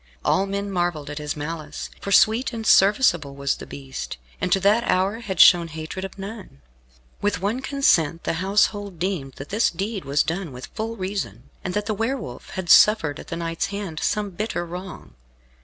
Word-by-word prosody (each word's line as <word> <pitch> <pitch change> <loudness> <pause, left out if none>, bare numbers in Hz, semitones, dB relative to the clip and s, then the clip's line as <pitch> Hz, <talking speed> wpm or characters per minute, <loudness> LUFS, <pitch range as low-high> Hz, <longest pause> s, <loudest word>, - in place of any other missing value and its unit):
All 195 - +2
men 200 +1 -3
marvelled 175 -5 -1
at 145 - -5
his 150 0 -4
malice, 155 0 -5
for 200 - -5
sweet 225 +6 +4
and 225 -1 -5
serviceable 190 - +4
was 140 0 -1
the - - -9
beast, 135 - -7 0.2
and 180 - -1
to 195 - +4
that 210 +4 +4
hour 190 +4 +2
had 190 -7 -5
shown 175 -2 +8
hatred 160 +4 -6
of 195 +1 -7
none. 195 - -9 0.6
With 205 -2 0
one 210 +7 -1
consent 170 - +2
the - - -1
household 200 -1 +1
deemed 165 -7 -2
that 135 +3 -9
this 215 +3 +2
deed 200 0 -4
was 140 +1 +2
done 170 0 -3
with 125 +1 -9
full 225 +1 -3
reason, 185 - -5
and 180 - -3
that 210 0 0
the 215 - -1
Wolf 225 - -4
had 185 -2 -5
suffered 165 -6 +5
at - - -10
the - - -4
knight's 165 -1 -2
hand 200 -6 -5
some 210 -2 -1
bitter 195 -2 -3
wrong. 180 +2 -8
190 Hz, 190 wpm, -23 LUFS, 160-205 Hz, 0.6 s, shown